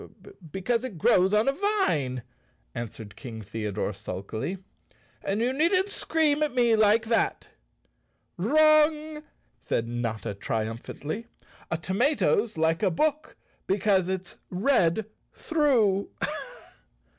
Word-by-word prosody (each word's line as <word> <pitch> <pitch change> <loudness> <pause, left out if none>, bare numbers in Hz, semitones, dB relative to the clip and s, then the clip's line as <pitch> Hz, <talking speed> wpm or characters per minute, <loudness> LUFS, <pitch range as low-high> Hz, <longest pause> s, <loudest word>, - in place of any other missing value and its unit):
"Because 230 - -1
it 240 -9 -6
grows 185 +4 +4
on 210 +3 +3
a - - +5
vine," 225 - 0 0.5
answered 110 -3 -7
King 115 -3 -8
The¬ 105 +2 -4
odore 105 0 -2
sulkily, 100 - -5 0.7
"and 200 +3 -1
you 250 +2 +1
needn't 365 +7 +2
scream 305 -2 +1
at 300 -4 0
me 240 -2 +4
like 220 +1 +4
that! 225 0 0 0.5
" - - -45
"Wrong!" 305 - +3 0.4
said 115 - -1
Notta 115 -4 -3
triumphantly. 115 - -4 0.4
"A 170 - -1
tomato's 215 - +1
like 160 +1 +1
a 200 - +3
book 305 - -1 0.3
because 195 -1 +2
it's 190 -1 -4
red 190 -2 +2 0.3
through." 245 - +2
200 Hz, 115 wpm, -27 LUFS, -, 0.7 s, a